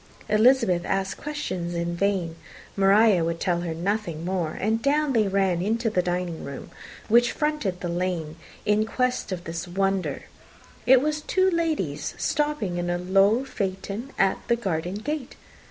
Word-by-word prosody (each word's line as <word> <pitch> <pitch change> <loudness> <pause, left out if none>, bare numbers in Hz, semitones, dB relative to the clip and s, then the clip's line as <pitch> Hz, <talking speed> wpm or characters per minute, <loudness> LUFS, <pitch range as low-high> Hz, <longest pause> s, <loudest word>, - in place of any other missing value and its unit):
Elizabeth 215 -5 +4
asked 195 +1 -1
questions 185 - -4
in 170 0 -2
vain; 185 -3 0 0.4
Maria 195 -1 +5
would 165 0 -2
tell 175 -2 0
her 165 -2 -3
nothing 175 -2 -2
more; 180 -4 -2
and 220 +3 0
down 290 +1 +2
they 220 -4 +3
ran 190 -3 +1
into 225 +3 0
the 185 - +2
dining 175 -2 -3
room 140 0 -8 0.4
which 240 +2 +4
fronted 300 -12 -1
the 175 - -2
lane, 170 -3 -2 0.3
in 210 +1 +3
quest 250 0 -1
of 180 -2 -4
this 165 +2 -5
wonder; 195 +1 -1 0.6
it 260 0 +7
was 300 0 -1
two 375 +4 +2
ladies, 335 -2 -1
stopping 295 -12 -1
in 175 0 -2
a 175 - 0
low 195 +7 +3
phaeton 200 +2 -4
at 195 -1 +2
the 235 - +3
garden 180 -5 -2
gate. 265 +5 -4
195 Hz, 155 wpm, -25 LUFS, 175-240 Hz, 0.6 s, it